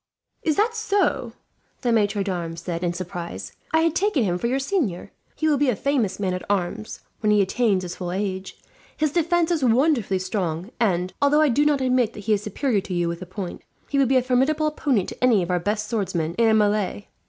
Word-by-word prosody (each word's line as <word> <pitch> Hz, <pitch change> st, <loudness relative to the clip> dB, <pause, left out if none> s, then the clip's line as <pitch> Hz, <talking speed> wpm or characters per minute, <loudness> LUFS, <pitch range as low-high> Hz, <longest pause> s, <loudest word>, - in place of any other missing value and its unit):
"Is 310 Hz, -3 st, +1 dB
that 440 Hz, +3 st, +2 dB
so?" 435 Hz, -3 st, 0 dB, 0.5 s
the 240 Hz, -, +1 dB
maitre 205 Hz, -2 st, +2 dB
d'armes 170 Hz, -4 st, -4 dB
said, 170 Hz, 0 st, -4 dB
in 175 Hz, -, +1 dB
surprise. 170 Hz, -, -6 dB, 0.2 s
"I 320 Hz, -, +3 dB
had 330 Hz, -1 st, +2 dB
taken 370 Hz, -, +2 dB
him 180 Hz, -3 st, 0 dB
for 235 Hz, -, 0 dB
your 255 Hz, +3 st, +1 dB
senior. 275 Hz, -, -1 dB, 0.2 s
He 315 Hz, -, 0 dB
will 295 Hz, -3 st, +3 dB
be 285 Hz, -2 st, +3 dB
a 245 Hz, -, +1 dB
famous 250 Hz, -4 st, 0 dB
man 190 Hz, -2 st, 0 dB
at 180 Hz, -, -3 dB
arms, 205 Hz, +2 st, -2 dB, 0.2 s
when 215 Hz, -, 0 dB
he 210 Hz, -, +4 dB
attains 200 Hz, 0 st, +2 dB
his 180 Hz, 0 st, -6 dB
full 175 Hz, -2 st, -4 dB
age. 190 Hz, 0 st, -3 dB, 0.4 s
His 305 Hz, -1 st, +1 dB
defence 340 Hz, +1 st, +1 dB
is 320 Hz, -5 st, 0 dB
wonderfully 245 Hz, -5 st, +3 dB
strong 185 Hz, 0 st, -3 dB
and, 185 Hz, -5 st, +1 dB
although 290 Hz, +2 st, +4 dB
I 305 Hz, -, +4 dB
do 290 Hz, +5 st, +3 dB
not 290 Hz, -2 st, +2 dB
admit 250 Hz, -3 st, +2 dB
that 210 Hz, -, -8 dB
he 215 Hz, +1 st, +1 dB
is 205 Hz, -, +1 dB
superior 210 Hz, +1 st, 0 dB
to 185 Hz, -1 st, -5 dB
you 175 Hz, -1 st, +1 dB
with 170 Hz, 0 st, -3 dB
the 185 Hz, -, -8 dB
point, 185 Hz, 0 st, -6 dB, 0.3 s
he 280 Hz, -, +1 dB
would 270 Hz, -3 st, +3 dB
be 265 Hz, -, +4 dB
a 255 Hz, -, +2 dB
formidable 265 Hz, +5 st, +2 dB
opponent 280 Hz, -, 0 dB
to -, -, -8 dB
any 230 Hz, -7 st, +4 dB
of 175 Hz, -, -3 dB
our 180 Hz, -, +2 dB
best 210 Hz, +3 st, -2 dB
swordsmen 185 Hz, -8 st, -1 dB
in 230 Hz, -1 st, +5 dB
a -, -, +4 dB
melee. 210 Hz, -1 st, +1 dB
215 Hz, 225 wpm, -23 LUFS, 185-275 Hz, 0.5 s, in